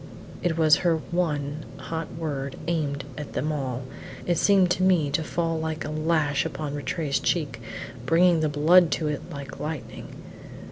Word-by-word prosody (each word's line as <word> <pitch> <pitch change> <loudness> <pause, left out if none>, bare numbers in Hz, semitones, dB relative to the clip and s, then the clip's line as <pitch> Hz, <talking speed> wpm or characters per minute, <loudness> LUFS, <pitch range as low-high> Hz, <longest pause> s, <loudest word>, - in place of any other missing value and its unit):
It 170 -2 0
was 155 -2 +6
her 170 -3 +2
one 155 -4 -1
hot 160 -1 -5
word; 140 -4 -3
aimed 145 -4 -1 0.2
at 150 - -7
them 150 +4 -1
all, 130 -4 -3 0.4
it 175 -1 +1
seemed 190 -3 +4
to 185 - +1
me 175 -6 +3
to 155 +3 +1
fall 165 0 -1
like 160 0 -3
a - - -4
lash 155 -2 +1
on 150 -2 -3
Rattray's 145 0 -1
cheek, 145 -9 -1 0.5
bringing 170 +1 +5
the 155 -1 +1
blood 160 +4 +5
to 155 - -1
it 150 - -2
like 140 -1 -7
lightning. 155 -3 -5
155 Hz, 160 wpm, -26 LUFS, 145-170 Hz, 0.5 s, was